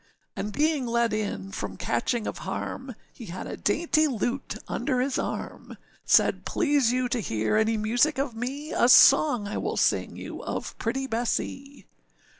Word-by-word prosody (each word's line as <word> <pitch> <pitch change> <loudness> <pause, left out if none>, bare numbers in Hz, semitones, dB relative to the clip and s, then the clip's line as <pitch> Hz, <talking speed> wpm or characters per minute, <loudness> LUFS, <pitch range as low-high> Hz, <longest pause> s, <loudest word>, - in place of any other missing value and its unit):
And 210 - -4
being 295 -1 +1
led 235 -1 +1
in 150 - -3
from 95 -1 -5
catching 215 - -1
of - - -4
harm, 260 -2 -5 0.2
He 230 - -10
had 180 +2 -6
a - - -5
dainty 310 +7 +2
lute 250 +1 -3
under 255 0 -1
his 260 +1 0
arm, - - -5 0.3
Said, - - +3
âPlease 285 -7 +2
you 250 0 0
to 250 - 0
hear 110 - -1
any 220 +1 +2
music 245 +8 +2
of 270 -2 -1
me, 270 +7 -5
A 240 - +3
song 250 -5 +6
I 205 - -3
will - - -3
sing - - +1
you - - -8
of - - -5
pretty 265 +4 -2
Bessee. 265 +2 -3
245 Hz, 165 wpm, -26 LUFS, 215-275 Hz, 0.3 s, song